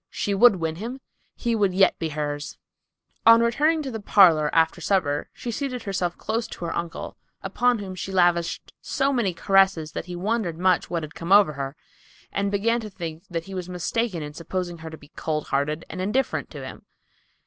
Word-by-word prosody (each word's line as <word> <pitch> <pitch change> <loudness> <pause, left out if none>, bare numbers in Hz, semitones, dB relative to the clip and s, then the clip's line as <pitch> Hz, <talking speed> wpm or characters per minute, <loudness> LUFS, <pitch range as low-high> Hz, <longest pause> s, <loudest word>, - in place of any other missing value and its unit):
She 205 - -2
would 220 +2 +6
win 165 -2 -3
him. 240 +7 -6 0.4
He 235 -1 -1
would 200 -4 +1
yet 195 0 +4
be 165 - -2
hers. 145 -1 -4 0.7
On 230 0 +9
returning 300 +7 +2
to 270 - -4
the 225 - -4
parlor 170 -7 +5
after 160 0 +2
supper 150 -7 0
she 240 - -6
seated 255 -1 -3
herself 180 -3 -2
close 225 +2 -2
to 175 - -7
her 165 - -3
uncle, 170 -1 -5 0.3
upon 240 +5 +2
whom 195 -3 -6
she 185 +1 -5
lavished 175 -2 +1
so 275 0 0
many 235 -7 +1
caresses 190 -3 +2
that - - -5
he 180 - -6
wondered 195 -2 -1
much 185 0 +2
what 170 -2 -2
had 155 0 -8
come 170 +2 -6
over 200 -6 +6
her, 140 0 -5 0.6
and 200 0 0
began 225 +4 +1
to 215 - -7
think 170 -4 -7
that 165 -1 -3
he 195 - -9
was 185 -1 -5
mistaken 180 0 -2
in 150 0 -7
supposing 175 +2 -4
her 160 0 -7
to 160 - -9
be 145 - -17
cold 155 -2 -3
hearted 150 +3 -1
and 185 - -6
indifferent 225 +8 -1
to - - -8
him. - - -10
185 Hz, 200 wpm, -24 LUFS, 165-215 Hz, 0.7 s, On